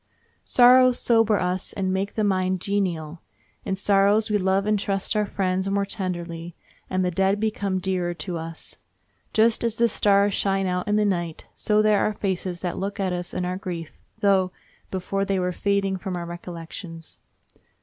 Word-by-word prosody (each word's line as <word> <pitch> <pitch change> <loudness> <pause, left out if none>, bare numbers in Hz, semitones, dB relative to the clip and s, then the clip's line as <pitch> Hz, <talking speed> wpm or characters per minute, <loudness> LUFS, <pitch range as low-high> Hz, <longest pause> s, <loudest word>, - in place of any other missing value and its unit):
Sorrows 250 0 +6
sober 225 -3 +3
us 180 +1 -1
and 190 -1 -1
make 195 +1 -2
the 215 - 0
mind 185 -2 +1
genial. 175 -5 -2 0.4
In 190 - -2
sorrows 200 +2 +3
we 210 - +2
love 190 +1 +1
and 210 -1 +2
trust 195 +1 -2
our 210 -1 +1
friends 190 0 -1
more 200 0 +1
tenderly, 175 -4 -5 0.3
and 185 0 0
the 180 - 0
dead 195 +3 +1
become 205 -3 -1
dearer 180 -2 -1
to 175 -1 -4
us. 165 0 -8 0.5
Just 225 +1 +3
as 230 -2 0
the 235 +1 +3
stars 200 -2 +3
shine 195 0 0
out 180 0 -1
in 210 - +2
the 210 0 +3
night, 175 -5 -2
so 215 0 +1
there 210 -1 +4
are 215 - +1
faces 185 -3 -3
that 180 -2 -3
look 200 +2 -4
at 190 -2 0
us 175 0 -4
in 180 - -2
our 180 +1 -2
grief, 170 -4 -6 0.3
though 190 -2 +3 0.4
before 195 +1 -2
they 195 0 0
were 180 0 0
fading 195 +1 0
from 185 0 -5
our 170 - -4
recollections. 170 -1 -8
190 Hz, 180 wpm, -24 LUFS, 180-205 Hz, 0.5 s, Sorrows